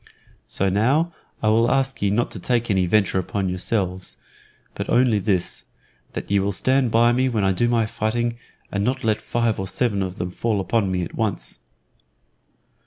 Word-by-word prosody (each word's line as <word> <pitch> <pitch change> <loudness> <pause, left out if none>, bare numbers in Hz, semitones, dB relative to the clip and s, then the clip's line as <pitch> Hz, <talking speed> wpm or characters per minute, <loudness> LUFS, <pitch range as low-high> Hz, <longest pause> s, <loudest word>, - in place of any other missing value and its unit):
So 95 - 0
now 135 - +2 0.3
I 110 - +4
will 115 +2 +4
ask 135 -1 0
ye 100 - +2
not 115 +4 0
to 105 - -6
take 120 +2 0
any 95 -2 +2
venture 95 0 +2
upon 95 +1 -2
yourselves, 95 0 -2 0.6
but - - -5
only 120 -4 +4
this: 95 -3 0 0.5
that - - -5
ye 100 - +4
will 100 +1 0
stand 130 +5 +2
by 115 +1 +4
me 130 +2 +2
when 110 -5 0
I 95 - +3
do 120 +6 +1
my 115 -2 +2
fighting, 120 +2 -2 0.3
and 100 0 -1
not 125 +4 -1
let 110 -1 +1
five 115 -3 0
or 95 - -3
seven 100 +1 0
of 95 -1 -3
them 90 -1 -4
fall 110 +2 -1
upon 100 0 0
me 90 -1 0
at - - -7
once. 110 - -2
110 Hz, 185 wpm, -23 LUFS, 95-120 Hz, 0.6 s, I